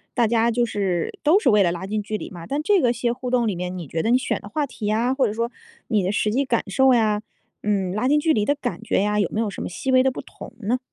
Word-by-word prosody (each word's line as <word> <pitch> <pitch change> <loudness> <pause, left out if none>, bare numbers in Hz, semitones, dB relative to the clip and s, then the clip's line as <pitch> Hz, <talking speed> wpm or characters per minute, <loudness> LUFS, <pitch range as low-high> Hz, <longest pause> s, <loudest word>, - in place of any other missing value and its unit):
大 240 - +3
家 230 +1 +2
就 240 +1 +1
是 195 -6 -2
都 320 +7 +4
是 270 - +2
为 210 -2 +5
了 175 - +3
拉 175 +2 -5
近 210 +2 -2
距 215 +1 -3
离 - - -7
嘛， 170 -2 -9
但 285 +2 -1
这 390 +1 +3
个 240 - +3
些 235 0 -1
互 250 0 -5
动 245 -2 +2
里 200 - -1
面 180 +1 -4
你 170 -5 -7
觉 160 - -2
得 225 - 0
你 245 - +5
选 260 - -2
的 200 - -10
话 295 +6 -1
题 225 -5 -6
呀， 230 +4 +1
或 265 -2 +2
者 210 - -3
说 230 +2 -2 0.4
你 215 -2 +2
的 185 +1 0
实 210 0 0
际 270 +5 +1
感 235 -4 0
受 265 +5 +4
呀， 215 -2 +2 0.4
嗯， 195 -3 0
拉 215 +5 0
近 295 +2 +4
距 315 +1 +2
离 210 -2 +1
的 285 - +2
感 245 -5 -4
觉 225 - 0
呀， 210 0 +1
有 200 - +1
没 215 - -2
有 225 -2 0
什 - - -7
么 - - -4
细 265 +9 -3
微 255 0 +6
的 265 - +3
不 260 - -6
同 - - -11
呢？ 235 +5 0
225 Hz, 330 characters per minute, -23 LUFS, 205-255 Hz, 0.4 s, 微